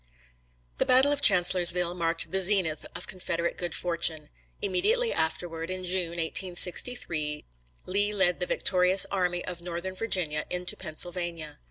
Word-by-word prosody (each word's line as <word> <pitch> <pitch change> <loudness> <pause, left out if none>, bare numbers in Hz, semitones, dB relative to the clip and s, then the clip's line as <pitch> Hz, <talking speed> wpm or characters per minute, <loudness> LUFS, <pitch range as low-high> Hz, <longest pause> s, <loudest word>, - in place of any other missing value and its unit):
The - - +1
battle 260 +3 +4
of 290 - -2
Chancellorsville 180 -2 +5
marked 165 -1 -3
the 190 0 +1
zenith 185 -5 +2
of - - -6
Confederate 170 -2 -4
good 175 -2 -5
fortune. 165 -3 +2 0.3
Immediately 425 +5 -1
afterward, 165 +1 -3
in 185 0 -6
June, 175 -2 -2
1863, 170 -2 0 0.4
Lee 205 +2 +1
led 190 -4 +1
the 180 - -3
victorious 185 +1 +3
army 180 -2 -2
of 175 -2 -8
Northern 175 +2 -7
Virginia 180 -7 -1
into 180 0 -4
Pennsylvania. 170 -2 -4
180 Hz, 135 wpm, -26 LUFS, 170-190 Hz, 0.4 s, Chancellorsville